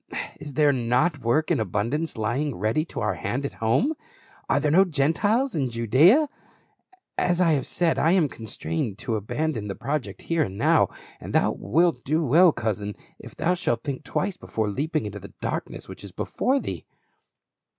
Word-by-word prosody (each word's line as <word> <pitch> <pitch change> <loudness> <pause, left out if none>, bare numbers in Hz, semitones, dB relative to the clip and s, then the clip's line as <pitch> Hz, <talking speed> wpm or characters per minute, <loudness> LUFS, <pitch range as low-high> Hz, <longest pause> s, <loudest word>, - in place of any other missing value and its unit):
is 145 -3 -9
there 150 -1 +4
not 130 +6 +1
work 130 +6 +1
in - - +2
abundance 115 - -1
lying 120 +6 -1
ready 110 +10 0
to 165 - -7
our - - +1
hand 135 +3 -3
at - - -4
home? 130 - +2 0.6
Are - - +3
there 150 - +1
no 185 +5 +7
Gentiles 195 - +1
in 135 -5 0
Judaea? 135 - +5 0.9
As 175 -1 +1
I 175 -3 +4
have 140 -4 0
said, 170 -2 +1
I 165 +3 +4
am 180 -5 +4
constrained 100 - -4
to 115 0 -2
abandon 110 +2 -2
the 100 - -4
project 145 -1 -4
here 165 -1 0
and 100 -9 -2
now, - - +4 0.3
and - - -8
thou - - +3
wilt 165 -5 +1
do 155 +3 +1
well, 165 +7 +6
cousin, 105 -5 -3 0.2
if - - -12
thou 180 - +1
shalt 120 -10 -1
think 140 -2 -4
twice 195 -1 -2
before 110 - -2
leaping 150 +4 -1
into 105 0 -6
the - - -12
darkness - - -4
which - - -9
is - - -9
before 270 +2 0
thee." - - -5
145 Hz, 180 wpm, -25 LUFS, 115-165 Hz, 0.9 s, no